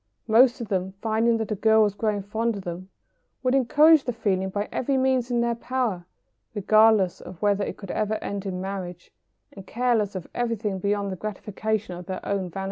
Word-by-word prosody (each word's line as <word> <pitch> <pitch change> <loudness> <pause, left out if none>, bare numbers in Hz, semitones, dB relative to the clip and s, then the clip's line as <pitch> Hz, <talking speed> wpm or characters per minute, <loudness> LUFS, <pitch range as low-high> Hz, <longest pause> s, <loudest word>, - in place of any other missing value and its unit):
Most 240 +4 +5
of 235 - -5
them, 190 0 -2
finding 225 +1 +1
that 220 -1 -4
a - - +1
girl 220 +2 +4
was 205 -2 +1
growing 205 -1 -1
fond 220 +3 -1
of 200 - -7
them, 180 +2 -7 0.5
would 255 0 +2
encourage 295 +4 +5
the 245 - 0
feeling 190 -4 -1
by 205 +2 -3
every 270 +1 0
means 260 -2 +1
in 240 -1 +1
their 235 0 +1
power, 230 -7 -2 0.5
regardless 215 -2 +4
of 180 - -11
whether 205 -1 +1
it - - -5
could 195 -3 -7
ever 215 0 -1
end 200 -2 -5
in 180 -1 -3
marriage, 185 -2 -6 0.4
and 195 -2 -12
careless 230 -4 0
of 185 -4 -5
everything 225 -5 -2
beyond 200 +1 -1
the - - -3
gratification 215 0 -3
of 180 +1 -10
their 185 -1 -4
own 195 -2 -2
vanity. 185 - -7
210 Hz, 200 wpm, -25 LUFS, 190-235 Hz, 0.5 s, Most